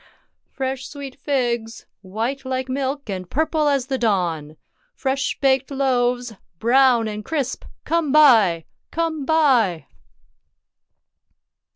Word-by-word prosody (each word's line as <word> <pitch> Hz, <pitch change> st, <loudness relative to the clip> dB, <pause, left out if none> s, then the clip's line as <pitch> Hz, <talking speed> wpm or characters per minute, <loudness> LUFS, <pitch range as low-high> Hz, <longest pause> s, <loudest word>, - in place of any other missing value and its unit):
— -, -, -52 dB
Fresh 265 Hz, -1 st, -3 dB
sweet 280 Hz, -3 st, -8 dB
figs! 240 Hz, -5 st, -2 dB, 0.2 s
white 225 Hz, +8 st, -4 dB
like 260 Hz, 0 st, -3 dB
milk, 275 Hz, +1 st, -3 dB
and 185 Hz, -3 st, -5 dB
purple 310 Hz, +1 st, 0 dB
as 275 Hz, -3 st, +1 dB
the 265 Hz, -1 st, -3 dB
dawn! 170 Hz, -9 st, -1 dB, 0.4 s
Fresh 270 Hz, 0 st, -1 dB
baked 265 Hz, -1 st, +2 dB
loaves, 250 Hz, -3 st, 0 dB, 0.2 s
brown 240 Hz, +1 st, +4 dB
and 210 Hz, 0 st, -5 dB
crisp. 280 Hz, -1 st, -3 dB, 0.2 s
Come 330 Hz, -4 st, 0 dB
buy! 225 Hz, -, +5 dB, 0.2 s
Come 320 Hz, -3 st, -2 dB
buy 245 Hz, -, +3 dB
260 Hz, 110 wpm, -21 LUFS, 225-280 Hz, 0.4 s, buy